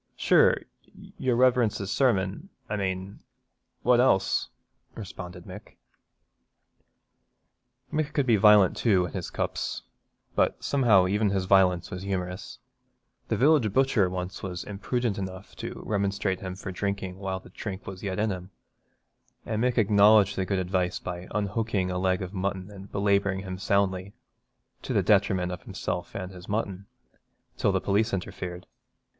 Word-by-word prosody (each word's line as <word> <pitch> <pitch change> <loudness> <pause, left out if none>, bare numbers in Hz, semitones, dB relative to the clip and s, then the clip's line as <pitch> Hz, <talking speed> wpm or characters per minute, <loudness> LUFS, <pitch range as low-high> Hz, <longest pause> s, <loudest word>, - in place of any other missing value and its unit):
'Sure, - - +4 0.6
your 125 -2 +1
Reverence's 120 -5 +2
sermon, 115 - +1 0.2
I 105 - -2
mane, 95 0 -3 0.6
what 125 -1 +4
else?' 95 -7 +2 0.5
responded 90 -4 -8
Mick. 100 +2 -11 2.2
Mick 155 -1 0
could 140 -3 +1
be 120 -3 +4
violent 105 -2 +6
too 95 -6 +3
in 85 - -7
his - - -4
cups, - - -3 0.5
but - - +1
somehow 115 -9 +4
even 105 +3 +1
his 95 -1 0
violence 90 -3 +3
was 90 - -5
humorous. 90 -1 -4 0.7
The - - 0
village 135 -5 +4
butcher 120 -5 +3
once 90 +1 -5
was 90 -3 -5
imprudent 105 +2 -2
enough 95 -1 -7
to - - -6
remonstrate 100 -2 -1
with 95 - -6
him 90 - -5
for 95 0 -6
drinking, 95 -1 -3
while 95 -1 -3
the - - -16
drink 100 -2 -6
was 95 -1 -8
yet 95 -2 -3
in 105 0 +1
him, 90 -1 -6 1.0
and 110 0 -1
Mick 125 0 +1
acknowledged 105 -1 +5
the 95 - -1
good 100 - 0
advice 90 -1 0
by 90 0 -6
unhooking 105 -2 -1
a 90 - -2
leg 95 0 +1
of 95 +1 -7
mutton 95 0 -3
and 100 0 -11
belabouring 100 -1 +1
him 95 -1 -6
soundly, 95 0 0 0.7
to - - -4
the - - +2
detriment 95 -3 +2
of 90 - -6
himself 90 0 -5
and 95 -1 -5
his 90 -1 -12
mutton, 100 -2 -3 0.7
till - - +1
the - - +1
police 105 +2 +1
interfered. 90 -1 -6
100 Hz, 150 wpm, -27 LUFS, 95-105 Hz, 2.2 s, violent